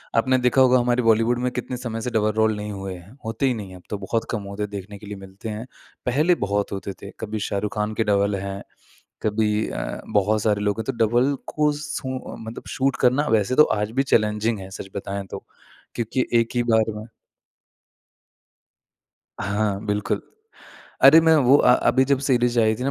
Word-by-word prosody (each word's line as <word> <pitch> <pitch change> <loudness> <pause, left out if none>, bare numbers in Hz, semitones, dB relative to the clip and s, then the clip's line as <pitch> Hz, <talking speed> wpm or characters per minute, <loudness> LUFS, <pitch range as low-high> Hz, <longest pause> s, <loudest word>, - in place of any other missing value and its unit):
आपने 130 +3 +3
देखा 125 +1 +3
होगा 130 -1 +6
हमारी 120 0 +1
बॉलीवुड 115 +2 +3
में 125 0 -1
कितने 125 0 -4
समय 115 -2 -5
से 125 - -2
डबल 110 -1 +2
रोल 110 0 +2
नहीं 105 0 -5
हुए 95 -1 -5
हैं, 90 +3 -14
होते 115 +5 -1
ही 130 - +3
नहीं 105 -5 -6
है 95 - -11
अब 90 - -13
तो 105 - -3
बहुत 105 +3 -2
कम 110 -4 -2
होते 100 +1 -4
देखने 100 0 -8
के 105 - -13
लिए 105 - -6
मिलते 95 +3 -9
हैं। 110 +2 -5 0.4
पहले 150 +8 +3
बहुत 100 0 -1
होते 100 0 -5
थे, 100 - -8
कभी 110 0 -4
शाहरुख़ 105 0 -2
ख़ान 105 0 -1
के 115 - +1
डबल 100 -1 +2
हैं, 100 0 -5 0.6
कभी 105 0 +1
अ, - - -4
बहुत 105 +1 +2
सारे 105 -2 +1
लोग 105 +1 0
हैं 110 - -3
तो - - -14
डबल 120 +5 +2 0.2
को 150 -1 +3
सू 135 -4 -4 0.3
मतलब 110 +1 -7
शूट 135 -1 +1
करना 130 +4 +3
वैसे 105 +4 0
तो 150 - +8 0.2
आज 105 +1 -2
भी - - 0
चैलेंजिंग 105 0 +2
है 95 0 -9
सच 95 - -7
बताएँ 100 0 -4
तो - - -7 0.5
क्योंकि 120 +2 -1
एक 115 - -3
ही 120 - +2
बार 110 0 +2
में 105 +1 -8 2.3
हाँ 100 0 -1
बिल्कुल। 105 0 -1 0.8
अरे 145 +4 +9
मैं 160 0 +5
वो 135 -1 +6
अ, 125 - +5
अभी 130 +1 +3
जब 140 0 +2
सीरीज़ 120 -2 +2
आई 110 -1 +3
थी 125 - -6
ना 135 - +1
110 Hz, 200 wpm, -23 LUFS, 105-125 Hz, 2.3 s, अरे